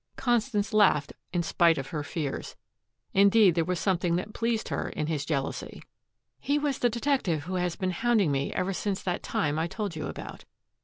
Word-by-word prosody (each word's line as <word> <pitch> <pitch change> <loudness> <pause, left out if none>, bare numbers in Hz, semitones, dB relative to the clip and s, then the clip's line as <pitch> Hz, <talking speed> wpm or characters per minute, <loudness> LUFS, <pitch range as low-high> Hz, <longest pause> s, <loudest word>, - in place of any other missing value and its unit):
Constance 230 -4 0
laughed 190 -9 +4 0.2
in 175 -2 0
spite 170 0 +3
of 135 -1 -4
her 155 -4 -3
fears. 145 -1 -4 0.6
Indeed, 200 -1 +6
there 165 0 +1
was 180 +1 -2
something 175 -3 +1
that 185 +4 -3
pleased 230 -1 -1
her - - -2
in 155 - -3
his 150 -3 -2
jealousy. 140 -3 -3 0.6
"He 285 +1 +1
was 290 -2 -1
the 245 - +3
detective 235 - 0
who 180 +4 -5
has 180 -1 -1
been 185 -2 -1
hounding 210 -3 +2
me 140 0 -1
ever 195 +2 -1
since 195 0 -2
that 180 -1 -2
time 150 0 -1
I 165 - 0
told 200 -1 -4
you 155 - -4
about." - - -8
180 Hz, 190 wpm, -28 LUFS, 160-215 Hz, 0.6 s, Indeed